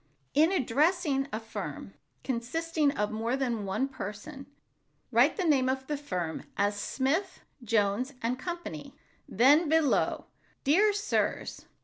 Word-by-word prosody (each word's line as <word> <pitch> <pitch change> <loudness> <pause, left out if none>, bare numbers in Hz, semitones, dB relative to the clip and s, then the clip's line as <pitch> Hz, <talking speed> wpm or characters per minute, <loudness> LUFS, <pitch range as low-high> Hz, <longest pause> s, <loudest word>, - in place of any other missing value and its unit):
In 315 +5 +4
addressing 300 -1 +1
a 215 - -2
firm 225 0 -7 0.3
consisting 295 +5 0
of 210 0 -1
more 225 +4 -1
than 235 -6 -1
one 195 +8 0
person, 270 +3 -8 0.6
write - - +4
the 375 - 0
name 270 -5 +3
of 265 0 -2
the 295 - -2
firm, 180 - -4 0.2
as 205 0 +1
"Smith, 280 - -1 0.2
Jones 220 +3 +1
and 245 +2 -2
Company," 340 - -6 0.3
then 290 - +5
below, 320 -2 +2 0.4
"Dear 390 +10 +4
Sirs." 405 0 -2
270 Hz, 125 wpm, -29 LUFS, 225-315 Hz, 0.6 s, then